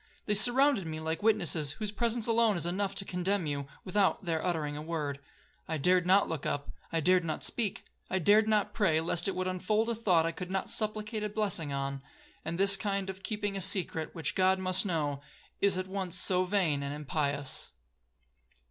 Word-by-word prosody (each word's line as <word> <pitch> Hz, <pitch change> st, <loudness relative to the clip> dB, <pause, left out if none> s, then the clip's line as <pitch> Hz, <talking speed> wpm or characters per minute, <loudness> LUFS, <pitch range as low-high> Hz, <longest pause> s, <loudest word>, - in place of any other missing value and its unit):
They 210 Hz, -, +1 dB
surrounded 245 Hz, -, +4 dB
me 155 Hz, 0 st, -4 dB
like 160 Hz, +1 st, -3 dB
witnesses, 175 Hz, -9 st, +1 dB
whose 210 Hz, +4 st, -4 dB
presence 230 Hz, +1 st, 0 dB
alone 230 Hz, -3 st, +3 dB
is 170 Hz, -, -2 dB
enough 195 Hz, +3 st, -1 dB
to 195 Hz, 0 st, -1 dB
condemn 185 Hz, 0 st, -1 dB
you, 140 Hz, -2 st, -3 dB, 0.2 s
without 195 Hz, 0 st, +1 dB
their 165 Hz, -2 st, -1 dB
uttering 155 Hz, -5 st, -1 dB
a 150 Hz, -, -5 dB
word. 150 Hz, -3 st, -3 dB, 0.5 s
I 160 Hz, -, -2 dB
dared 180 Hz, +4 st, +3 dB
not 195 Hz, +2 st, +5 dB
look 160 Hz, -4 st, -4 dB
up,—I 145 Hz, +3 st, -4 dB
dared 180 Hz, +3 st, +4 dB
not 160 Hz, -2 st, -3 dB
speak,—I 205 Hz, -4 st, -3 dB
dared 205 Hz, +5 st, +4 dB
not 210 Hz, -1 st, +1 dB
pray, 180 Hz, -8 st, +2 dB
lest 170 Hz, +2 st, -1 dB
it 195 Hz, -, -1 dB
would 185 Hz, -, -2 dB
unfold 215 Hz, +5 st, 0 dB
a -, -, +2 dB
thought 185 Hz, -8 st, +2 dB
I 165 Hz, -, 0 dB
could 180 Hz, +1 st, -7 dB
not 190 Hz, 0 st, -2 dB
supplicate 215 Hz, 0 st, -1 dB
a 210 Hz, -, -1 dB
blessing 200 Hz, -8 st, -1 dB
on; 140 Hz, 0 st, -3 dB, 0.4 s
and 170 Hz, +1 st, -3 dB
this 195 Hz, +1 st, +4 dB
kind 195 Hz, -1 st, -2 dB
of 190 Hz, +1 st, -14 dB
keeping 205 Hz, -1 st, -3 dB
a 195 Hz, -, -2 dB
secret, 180 Hz, -4 st, 0 dB
which 165 Hz, -, -2 dB
God 190 Hz, 0 st, +3 dB
must 185 Hz, +1 st, +1 dB
know, 145 Hz, -5 st, -1 dB, 0.4 s
is 200 Hz, -2 st, +2 dB
at 185 Hz, -, -2 dB
once 190 Hz, -2 st, -2 dB
so 185 Hz, 0 st, +2 dB
vain 180 Hz, -7 st, +1 dB
and 140 Hz, +1 st, -4 dB
impious. 145 Hz, -2 st, -2 dB
185 Hz, 195 wpm, -30 LUFS, 160-205 Hz, 0.5 s, not